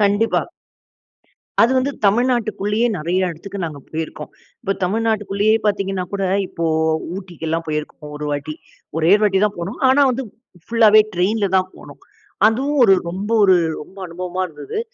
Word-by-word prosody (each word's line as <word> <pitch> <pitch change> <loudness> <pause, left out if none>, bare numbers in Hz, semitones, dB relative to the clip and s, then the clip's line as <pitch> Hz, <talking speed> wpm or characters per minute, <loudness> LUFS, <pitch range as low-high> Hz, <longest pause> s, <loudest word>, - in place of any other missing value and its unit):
கண்டிப்பா. 205 +2 +2 1.2
அது 230 - +4
வந்து 260 +2 +1 0.2
தமிழ்நாட்டுக்குள்ளேயே 220 -1 +1
நெறைய 180 +3 0
எடத்துக்கு 195 +5 -8
நாங்க 155 -3 -6
போயிருக்கோம். 160 0 -5 0.3
இப்ப 195 -4 0
தமிழ்நாட்டுக்குள்ளேயே 215 0 +1
பார்த்தீங்கன்னா 195 -2 -1
கூட, 200 -1 -2 0.3
இப்போ 170 - -4 0.5
ஊட்டிக்கெல்லாம் 165 -3 -4
போயிருக்கோம் 150 -1 -5
ஒரு 150 0 -5
வாட்டி. 145 +1 -3 0.4
ஒரே 165 +3 +4
ஒரு 210 - -4
வாட்டி 190 -2 +2
தான் 210 -1 -1
போனோம். 175 +3 -5
ஆனா 275 +2 +5
வந்து 260 +2 -3 0.4
ஃபுல்லாவே 220 -2 +6
ட்ரெயின்ல 200 +4 +1
தான் 185 0 0
போனோம். - - -13 0.5
அதுவும் 270 +7 +1
ஒரு 195 -4 +6 0.2
ரொம்ப 195 +5 -5
ஒரு 190 -2 +6 0.3
ரொம்ப 190 +6 -15
அனுபவமா 180 +2 -5
இருந்தது. 150 - -7
195 Hz, 140 wpm, -20 LUFS, 170-215 Hz, 1.2 s, ஃபுல்லாவே